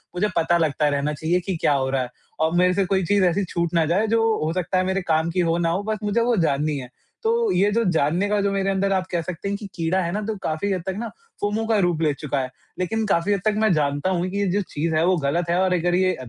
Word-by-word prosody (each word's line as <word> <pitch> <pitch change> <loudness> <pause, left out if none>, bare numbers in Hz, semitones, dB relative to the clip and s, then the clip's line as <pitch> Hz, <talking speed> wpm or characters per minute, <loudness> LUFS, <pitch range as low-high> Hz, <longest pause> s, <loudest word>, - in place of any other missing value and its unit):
मुझे 205 +4 +1
पता 170 +1 +3
लगता 150 -2 +1
रहना 145 +1 -1
चाहिए 160 +4 0
कि 180 +1 -3
क्या - - +3
हो 135 -1 0
रहा 135 0 0
है? 125 - -4 0.3
और 160 +1 +1
मेरे 180 +1 +4
से 195 +1 +1
कोई 190 0 +1
चीज़ 200 +3 +2
ऐसी 180 +3 +1
छूट 170 -1 -2
ना 165 -2 +3
जाए 185 +8 +1
जो 225 +1 +2 0.2
हो 155 - 0
सकता 185 +1 -1
है 185 - +2
मेरे 190 +1 0
काम 160 -1 +1
की 185 - -1
हो 170 -1 +2
ना 170 -1 +1
हो 180 +4 -1
बस 215 +1 -2
मुझे 210 +3 +1
वो 240 0 +2
जाननी 150 -2 +1
है। 125 -2 -7 0.3
तो 455 -1 +2
ये 200 - +3
जो 230 +2 +1
जानने 165 +5 +1
का 210 0 +1
जो 200 0 +1
मेरे 195 0 0
अंदर 195 0 0
आप 185 -1 0
कह 175 -2 0
सकते 180 +2 -6
हैं 200 - -2
कि 205 - -9
कीड़ा 170 +3 0
है 170 -1 -2
ना 210 +3 -2
तो 220 0 -2
काफ़ी 160 +6 -1
हद 185 -2 -1
तक 190 - -2
ना 230 +2 -3 0.3
फोमो 210 +2 -1
का 225 -2 +2
रूप 175 -4 +1
ले 155 -2 +2
चुका 140 -1 -3
है। 130 -1 -3 0.3
लेकिन 220 +5 -1
काफ़ी 200 0 +1
हद 200 - -1
तक 215 - +3
मैं 215 -2 +3
जानता 145 +2 0
हूँ 180 0 0
कि 200 - -4
ये 200 - +1
जो 205 +3 +1
चीज़ 160 +2 -1
है 160 +2 +3
वो 185 +1 +3
गलत 165 +4 -1
है 175 - +2
और 185 -1 +2
अगर 175 0 +1
ये 185 0 +2
180 Hz, 290 wpm, -23 LUFS, 160-200 Hz, 0.3 s, मेरे